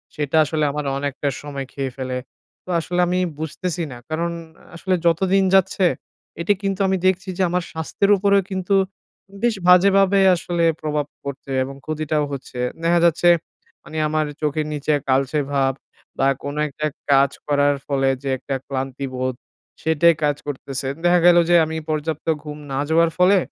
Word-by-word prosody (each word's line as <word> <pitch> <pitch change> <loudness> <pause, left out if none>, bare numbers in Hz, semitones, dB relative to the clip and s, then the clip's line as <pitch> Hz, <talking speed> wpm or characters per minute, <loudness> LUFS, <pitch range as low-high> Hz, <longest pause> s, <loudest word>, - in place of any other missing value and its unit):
সেটা 150 +1 0
আসলে 155 +1 -1
আমার 150 0 -4
অনেকটা 145 0 -3
সময় 140 -2 -6
খেয়ে 135 -2 -3
ফেলে। 130 -1 -3 0.5
তো - - -15
আসলে 175 +2 -3
আমি 180 +1 0 0.2
বুঝতেছি 170 +2 -3
না 125 - -8
কারণ 170 +2 -1 0.4
আসলে 185 +2 0
যতদিন 190 +3 +3
যাচ্ছে, 190 0 +3 0.6
এটি 190 +5 +3
কিন্তু 195 0 -1
আমি 190 0 +1
দেখছি 185 +1 0
যে - - -1
আমার 180 0 0
স্বাস্থ্যের 160 +5 0
উপরেও 200 0 +3
কিন্তু 190 +1 0 0.7
বেশ 240 -2 +2
বাজেভাবে 195 +2 +5 0.2
আসলে 170 0 -2 0.2
প্রভাব 150 -1 -1 0.2
পড়ছে 140 -1 -7
এবং 135 +1 -7
ক্ষতিটাও 155 -1 -1
হচ্ছে। 130 -2 -7 0.2
দেখা 170 +1 +3
যাচ্ছে 170 +1 +4 0.5
মানে 155 - -8
আমার 155 0 0 0.2
চোখের 150 0 0
নিচে 150 +1 0 0.2
কালচে 135 +3 +2
ভাব 135 -1 +2 0.5
বা 135 - +3 0.2
কোনো 145 +1 -4
একটা 150 +1 -5 0.3
কাজ 135 0 +5 0.2
করার 145 -1 +3
ফলে 135 -1 +1
যে 140 - -2
একটা 135 +2 -4
ক্লান্তিবোধ, 130 -1 -3 0.5
সেটাই 160 +1 +4
কাজ 145 -1 +2
করতেছে। 135 -1 -4 0.2
দেখা 175 0 +5
গেলো 175 -1 +7
যে 175 - +5
আমি 160 0 -4
পর্যাপ্ত 155 0 -2 0.2
ঘুম 150 -1 -7
না 135 - -1
যাওয়ার 165 +1 +4
ফলে, 185 +2 +5
155 Hz, 160 wpm, -21 LUFS, 140-175 Hz, 0.7 s, গেলো